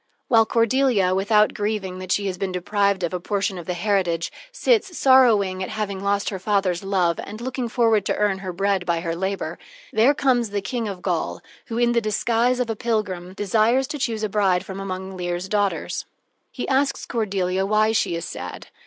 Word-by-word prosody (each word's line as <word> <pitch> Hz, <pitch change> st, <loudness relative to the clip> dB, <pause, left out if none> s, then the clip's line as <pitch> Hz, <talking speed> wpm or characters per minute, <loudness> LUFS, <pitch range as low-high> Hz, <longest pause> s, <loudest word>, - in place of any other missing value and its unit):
While 225 Hz, -2 st, +5 dB
Cordelia, 230 Hz, -5 st, +2 dB
without 210 Hz, +2 st, +3 dB
grieving 205 Hz, -3 st, -3 dB
that 185 Hz, 0 st, -6 dB
she 205 Hz, -, +1 dB
has 190 Hz, -2 st, -2 dB
been 195 Hz, -1 st, -2 dB
deprived 200 Hz, +1 st, 0 dB
of 170 Hz, -, -1 dB
a 180 Hz, -, -1 dB
portion 195 Hz, 0 st, -2 dB
of 170 Hz, -, -10 dB
the 180 Hz, -, -2 dB
heritage, 175 Hz, -3 st, 0 dB, 0.2 s
sits 440 Hz, -7 st, +1 dB
sorrowing 220 Hz, -8 st, +4 dB
at 185 Hz, -, -3 dB
having 205 Hz, -3 st, -3 dB
lost 200 Hz, 0 st, +1 dB
her 190 Hz, -, -4 dB
father's 190 Hz, -3 st, 0 dB
love, 185 Hz, -4 st, +1 dB
and 215 Hz, +2 st, -8 dB
looking 250 Hz, 0 st, -3 dB
forward 225 Hz, -4 st, +3 dB
to -, -, +1 dB
earn 205 Hz, -2 st, +1 dB
her 190 Hz, -1 st, -5 dB
bread 195 Hz, +1 st, 0 dB
by 170 Hz, -2 st, 0 dB
her 165 Hz, -1 st, -2 dB
labor, 190 Hz, -2 st, -3 dB, 0.3 s
there 235 Hz, +7 st, +4 dB
comes 245 Hz, -5 st, +2 dB
the 205 Hz, 0 st, -1 dB
King 230 Hz, +3 st, -3 dB
of 190 Hz, -3 st, -6 dB
Gaul, -, -, -1 dB, 0.3 s
who, 230 Hz, -, -4 dB
in 240 Hz, 0 st, +3 dB
the 235 Hz, 0 st, +2 dB
disguise 230 Hz, +3 st, +1 dB
of 250 Hz, -, 0 dB
a -, -, -3 dB
pilgrim, 200 Hz, -6 st, -2 dB
desires 220 Hz, +6 st, +2 dB
to 295 Hz, -, -4 dB
choose 230 Hz, -5 st, -1 dB
a 215 Hz, -, 0 dB
bride 195 Hz, -3 st, +1 dB
from 190 Hz, 0 st, -7 dB
among 190 Hz, 0 st, -5 dB
Leir's 175 Hz, 0 st, -3 dB
daughters. 205 Hz, -1 st, -1 dB, 0.4 s
He 250 Hz, -, -5 dB
asks 275 Hz, +1 st, +1 dB
Cordelia 195 Hz, -5 st, -1 dB
why 215 Hz, +2 st, +3 dB
she 200 Hz, -5 st, +1 dB
is 170 Hz, 0 st, -4 dB
sad. 90 Hz, 0 st, -7 dB
200 Hz, 195 wpm, -23 LUFS, 185-225 Hz, 0.4 s, While